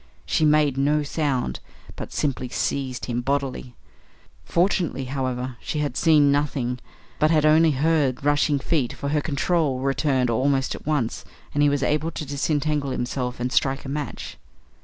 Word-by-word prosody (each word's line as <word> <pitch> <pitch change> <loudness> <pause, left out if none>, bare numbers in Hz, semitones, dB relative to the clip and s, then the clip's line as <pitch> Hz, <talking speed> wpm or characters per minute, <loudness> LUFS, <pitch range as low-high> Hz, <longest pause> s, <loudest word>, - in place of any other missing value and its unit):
She 155 - +1
made 150 -3 +3
no 150 +2 +2
sound, 140 - -1 0.4
but - - -7
simply 130 -3 -2
seized 130 -1 -2
him 120 -1 -2
bodily. 135 -2 -2 0.7
Fortunately, 175 -6 0
however, 130 -1 -3
she 155 - -4
had 145 -4 -1
seen 150 -4 +4
nothing, 135 -4 -1 0.4
but 155 - +4
had 155 -2 +3
only 160 +1 +5
heard 145 -2 +2
the - - -19
rushing 145 0 +3
feet, 140 -3 -1
for 140 - -4
her 150 0 +1
control 145 -2 0
returned 135 -2 +1
almost 135 +3 +1
at - - -10
once, 145 -7 -1 0.3
and 145 - +1
he 145 - +5
was 140 -1 0
able 150 +4 +1
to 155 - -5
disentangle 145 0 -1
himself 125 -1 -3
and 125 +1 -2
strike 135 +1 +1
a - - -5
match. 145 +1 -5
140 Hz, 160 wpm, -24 LUFS, 130-150 Hz, 0.7 s, only